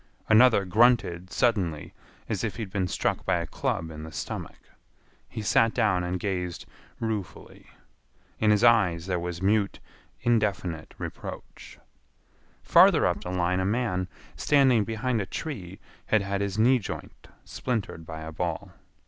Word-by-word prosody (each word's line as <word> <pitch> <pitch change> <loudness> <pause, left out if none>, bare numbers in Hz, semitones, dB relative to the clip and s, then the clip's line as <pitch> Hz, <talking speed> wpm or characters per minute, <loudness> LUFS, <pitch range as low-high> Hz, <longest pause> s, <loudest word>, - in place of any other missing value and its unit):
Another 110 -2 +6
grunted 95 -4 +2
suddenly 90 -11 0 0.3
as - - -2
if - - -2
he 115 - -4
had 95 - -9
been 95 -2 -1
struck - - -1
by 95 - +1
a 85 -1 -1
club 80 0 -3
in 75 -1 -8
the 80 +1 -8
stomach. - - -6 0.7
He 110 - -6
sat 115 +2 +3
down 90 -4 +2
and 90 +1 -2
gazed 90 -3 -3 0.3
ruefully. 105 -7 -5 0.7
In 110 - +3
his 105 +1 +3
eyes 95 -9 +4
there 90 -2 -1
was 90 +1 -5
mute, 100 0 +1 0.4
indefinite 100 -8 -1
reproach. - - -8 0.9
Farther - - +6
up - - 0
the - - -5
line 90 0 0
a 95 - 0
man, 100 -4 0 0.3
standing 130 -7 +3
behind 115 +1 -1
a 95 - -5
tree, 95 - -6 0.3
had 110 -2 +2
had 100 0 -2
his 100 0 -2
knee 125 +4 +4
joint 105 - -8 0.2
splintered 110 -9 -3
by 80 0 -8
a 80 0 -7
ball. 85 0 -4
100 Hz, 150 wpm, -27 LUFS, 90-110 Hz, 0.9 s, Another